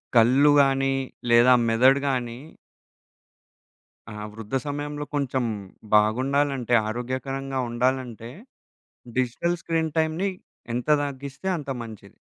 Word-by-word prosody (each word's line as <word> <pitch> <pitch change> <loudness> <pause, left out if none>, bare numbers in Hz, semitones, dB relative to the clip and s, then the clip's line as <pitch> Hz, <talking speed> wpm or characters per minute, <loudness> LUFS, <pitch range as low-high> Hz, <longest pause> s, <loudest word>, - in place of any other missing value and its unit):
కళ్ళు 130 +6 +6
గాని 135 0 +2 0.4
లేదా 120 +2 +6 0.2
మెదడు 130 +5 +4
గాని 120 -2 -2 1.7
ఆ! - - -9 0.2
వృద్ధ 115 +3 -6
సమయంలో 145 +1 -4
కొంచెం 130 -3 0 0.5
బాగుండాలంటే, 130 +3 +2 0.2
ఆరోగ్యకరంగా 130 +3 -3
ఉండాలంటే 120 -1 -2 0.9
డిజిటల్ 150 +8 0
స్క్రీన్ 160 -2 -1
టైమ్‌ని 160 +5 0 0.5
ఎంత 125 - -3 0.2
తగ్గిస్తే 140 +5 -6
అంత 145 -2 -7
మంచిది. 105 -3 -12
130 Hz, 90 wpm, -25 LUFS, 120-140 Hz, 1.7 s, కళ్ళు